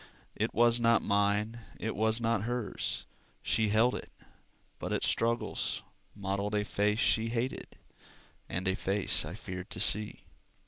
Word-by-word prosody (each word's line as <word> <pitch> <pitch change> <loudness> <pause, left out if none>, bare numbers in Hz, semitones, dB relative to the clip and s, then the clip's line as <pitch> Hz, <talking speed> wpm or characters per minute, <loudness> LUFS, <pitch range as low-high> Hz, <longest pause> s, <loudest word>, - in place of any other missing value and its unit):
It - - -1
was 120 +1 +4
not 115 -1 +3
mine, 100 +3 +1 0.2
it 110 - -3
was 110 +1 +2
not 115 -3 0
hers; 120 -2 -3 0.4
She 110 +3 +1
held 115 +4 +3
it, - - -7 0.7
but - - -4
its - - +1
struggles 115 +1 0 0.3
Modeled 100 +1 -2
a 105 0 0
face 105 0 +1
she 115 -1 +2
hated, 120 +3 -3 0.7
And 90 +1 -3
a 95 - +3
face 95 -3 +1
I 80 +4 -6
feared 95 -3 -7
to - - -5
see. 105 0 +3
105 Hz, 145 wpm, -31 LUFS, 100-115 Hz, 0.7 s, was